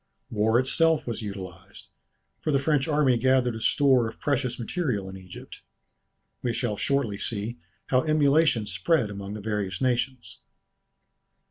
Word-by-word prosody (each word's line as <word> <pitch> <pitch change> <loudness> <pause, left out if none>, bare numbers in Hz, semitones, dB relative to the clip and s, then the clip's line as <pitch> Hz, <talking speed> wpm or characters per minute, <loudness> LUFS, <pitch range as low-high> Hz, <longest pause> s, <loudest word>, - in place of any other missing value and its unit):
War 110 +2 +2
itself 155 +4 +2
was 120 -1 -4
utilized, 100 -4 -9 0.5
for 155 - -1
the 140 - +3
French 140 0 +1
army 145 -5 +3
gathered 130 -1 +2
a - - -5
store 130 -1 +3
of - - -9
precious 135 -4 -1
material 120 - -2
in 95 - -8
Egypt. 90 -1 -11 0.8
We 120 -2 -1
shall 115 -2 -1
shortly 115 -4 -1
see 115 +2 -3 0.3
how 130 -1 +4
emulation 150 -5 +3
spread 105 - +1
among 100 0 -6
the 105 - -6
various 100 -3 -3
nations. 125 0 -2
120 Hz, 140 wpm, -26 LUFS, 105-140 Hz, 0.8 s, how